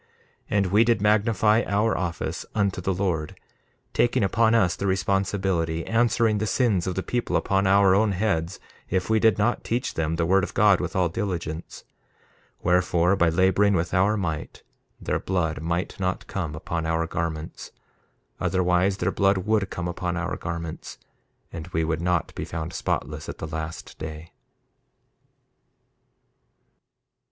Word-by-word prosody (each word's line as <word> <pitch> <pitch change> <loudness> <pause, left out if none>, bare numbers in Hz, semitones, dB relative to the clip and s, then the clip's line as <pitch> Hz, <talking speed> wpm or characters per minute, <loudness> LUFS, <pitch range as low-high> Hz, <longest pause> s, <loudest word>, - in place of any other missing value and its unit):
1:19 - - -36 0.5
And 100 - +3
we 105 +3 +5
did 115 -1 +2
magnify 105 +1 +3
our 105 +3 +1
office 85 -2 -3
unto 100 -3 0
the 95 - -1
Lord, 90 -5 -2 0.5
taking 120 -3 +2
upon 115 +3 +3
us 95 -7 +3
the 100 - -3
responsibility, 95 -4 0
answering 115 -1 +2
the 110 - -1
sins 105 -8 +1
of 90 - -2
the 95 - -2
people 120 -1 -2
upon 95 0 +1
our 100 0 +5
own 105 +1 +3
heads 90 -3 -1 0.3
if 95 +3 -1
we 110 - +4
did 110 -3 +4
not 115 +4 +1
teach 120 +2 -2
them 80 0 -1
the 85 0 0
word 95 +2 +3
of - - -5
God 105 -3 +5
with 90 -2 -4
all 90 -1 +3
diligence; 85 -4 -4 0.8
wherefore, 90 +1 +3
by 85 -3 +3
laboring 95 +4 +3
with 85 0 -1
our 100 +4 +3
might 80 -6 -4 0.4
their - - -1
blood 80 -5 -1
might 85 +4 -2
not 95 -1 -2
come 85 -6 -4
upon 80 +1 -3
our 80 0 0
garments; 80 -2 -5 0.7
otherwise 95 +1 +1
their - - 0
blood 95 -1 +2
would 100 +1 0
come 85 0 -4
upon 90 0 -3
our 90 +1 -2
garments, 85 -1 -6 0.6
and 80 -2 -6
we 80 - -1
would 80 0 -1
not 90 -1 0
be - - -5
found 80 +1 -5
spotless 75 -1 -3
at - - -6
the - - -5
last 80 0 -6
day. 80 +1 -8
95 Hz, 155 wpm, -25 LUFS, 85-100 Hz, 0.8 s, we